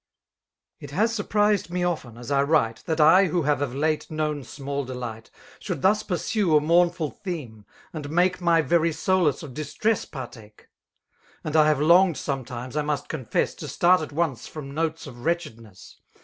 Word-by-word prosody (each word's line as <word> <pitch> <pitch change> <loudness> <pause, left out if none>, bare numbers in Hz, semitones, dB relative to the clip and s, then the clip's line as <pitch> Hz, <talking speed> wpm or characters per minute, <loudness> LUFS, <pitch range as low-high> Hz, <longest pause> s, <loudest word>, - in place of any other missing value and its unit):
It - - -9
ha3 225 +2 +1
surprised 210 -3 +1
me 180 0 -2
often, 155 -10 -3
as 120 +3 -8
I 140 -1 +3
write. 140 -6 +1
That 160 0 -1
I, 175 +6 +7
who 170 0 0
hare 145 0 +1
of 135 -3 -2
late 155 +2 -1
known 155 -2 -2
smtdl 140 0 -5
delight. 120 -3 -6 0.3
Should - - -5
thus 210 +3 +4
pursue 185 -2 +1
a - - +5
mournful 170 0 +2
theme, 125 - -7 0.3
and 150 -3 -6
make 180 +3 +1
My 170 -2 +3
very 165 0 +2
solace 175 -3 +1
of 140 -5 -9
distress 205 - -1
partake. 115 -6 -11 0.7
And 155 0 -4
I 155 -1 +6
have 150 -3 +2
longed 170 +3 +5
sometimes, 130 -2 -5
I 150 - +1
must 145 -1 -3
confesSi 130 -8 -2
To - - -6
start 180 0 +3
at 155 - -6
once 145 -6 -2
from 140 -3 -8
notes 160 +1 -2
of 120 -4 -11
wretchedness. 115 - -4
155 Hz, 175 wpm, -25 LUFS, 135-175 Hz, 0.7 s, I